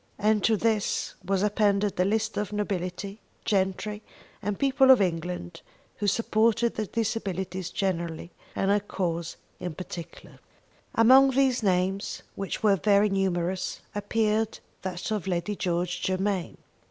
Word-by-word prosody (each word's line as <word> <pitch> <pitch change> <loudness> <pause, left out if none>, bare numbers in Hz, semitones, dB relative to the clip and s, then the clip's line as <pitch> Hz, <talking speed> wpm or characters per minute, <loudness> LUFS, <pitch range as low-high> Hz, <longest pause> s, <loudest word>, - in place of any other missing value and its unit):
And 210 0 +2
to 220 -1 +3
this 220 -1 0
was 195 +1 0
appended 205 -2 +1
a 180 - +4
list 220 +2 0
of 210 -2 -1
the 210 - -6
nobility, 195 0 -3 0.2
gentry, 200 +1 0 0.4
and 205 -1 -2
people 270 -1 +4
of 260 - +9
England 175 -2 -2 0.4
who 205 - -1
supported 230 +2 +2
the 215 -1 -3
Disabilities 190 -5 -2
generally 170 -3 -2 0.2
and 195 +1 +1
her 205 - +4
cause 170 -4 -3 0.2
in 175 -3 -5
particular. 170 -1 -9 0.6
Among 260 +4 +7
these 265 -2 +2
names, 190 0 0
which 195 +2 -4
were 200 -2 +5
very 205 +3 +4
numerous, 185 -2 -1
appeared 215 +1 0 0.2
that 185 +2 -4
of 210 -3 -2
Lady 180 +3 -1
George 175 -1 -1
Germain. 190 -1 -1
200 Hz, 135 wpm, -27 LUFS, 180-215 Hz, 0.6 s, of